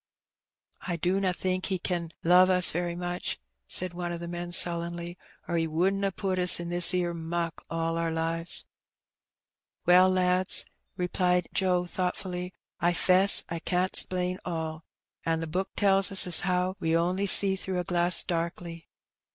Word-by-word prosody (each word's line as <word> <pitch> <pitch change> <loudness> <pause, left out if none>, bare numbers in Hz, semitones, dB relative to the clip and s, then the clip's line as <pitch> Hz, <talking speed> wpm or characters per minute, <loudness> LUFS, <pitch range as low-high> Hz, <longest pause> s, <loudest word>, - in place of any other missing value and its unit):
"I 175 - -2
dunna 185 +3 -1
think 185 +1 -3
He 190 - -1
ken 175 -2 -4
love 180 +2 +5
us 180 -1 +4
very 175 +1 -3
much," 175 0 -4 0.3
said 180 - -1
one 175 0 -5
of 170 - -5
the 170 - -7
men 175 0 -6
sullenly, 170 0 +2 0.2
" - - -32
or 170 - -2
He 165 0 -1
wouldn't 190 +5 -1
ha' 195 - +1
put 190 -2 -2
us 180 -1 +5
in 170 0 -6
this 175 0 +6
'ere 175 -1 -1
muck 170 0 -5
all 165 0 -3
our 165 0 -1
lives." 165 +1 -3 1.2
"Well, 180 +1 +5
lads," 185 0 +1 0.3
repKed 180 -1 -1
Joe 180 -2 0
thoughtfully, 180 0 -4 0.3
"I 175 +1 +1
'fess 185 +3 +5
I 170 - -5
can't 180 +2 -2
'splain 180 0 +1
all. 160 -2 -6 0.4
An' 165 0 -1
the 165 - -4
Book 185 +5 -3
tells 195 -1 +2
us 190 -2 +4
how 180 +1 -1
we 165 0 -1
on'y 180 +4 0
see 195 0 +7
through 190 -1 -5
a 180 - -2
glass 175 0 0
darkly. 170 -1 -5
180 Hz, 165 wpm, -27 LUFS, 170-185 Hz, 1.2 s, see